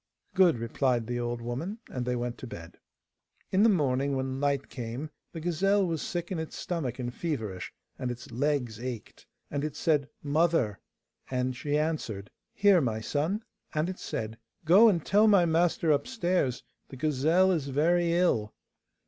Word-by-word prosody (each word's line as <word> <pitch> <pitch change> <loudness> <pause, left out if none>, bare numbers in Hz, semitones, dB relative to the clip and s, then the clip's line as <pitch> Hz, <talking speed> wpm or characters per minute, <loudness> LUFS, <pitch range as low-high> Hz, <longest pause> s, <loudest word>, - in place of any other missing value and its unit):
'Good,' 180 -8 +5
replied 120 +1 0
the 120 +1 -2
old 120 0 -3
woman, 150 - -4
and 125 -1 -3
they 125 - +1
went 120 0 -3
to 130 - -7
bed. 85 -5 -10 0.7
In 190 - +3
the 225 - +6
morning, 140 -6 +1
when 130 0 -2
light 140 -1 0
came, 125 +5 -6 0.2
the 165 - -6
gazelle 190 +4 +2
was 165 -3 -2
sick 175 -4 -4
in 180 - -1
its 160 - -5
stomach 150 -9 -3
and 120 -2 -4
feverish, 110 - -4 0.3
and 125 - -2
its 120 -1 -7
legs 125 -3 -1
ached. 120 -3 -7 0.2
And 145 0 -2
it 150 -1 -3
said 145 -4 +1
'Mother!' 145 - +2 0.5
And 125 0 -1
she 145 +3 -1
answered, 145 -11 -2 0.2
'Here, 200 -5 +5
my 115 -5 -1
son?' 155 - -1 0.3
And 155 +3 +1
it 185 - -6
said, 110 +1 -4 0.3
'Go 200 +8 +8
and 170 -7 0
tell 210 +2 +5
my 200 -5 +6
master 165 -1 +2
upstairs 175 - 0 0.3
the - - -9
gazelle 155 +6 +3
is 155 -6 0
very 170 +5 +2
ill. 140 -12 +1
145 Hz, 165 wpm, -29 LUFS, 125-175 Hz, 0.7 s, Go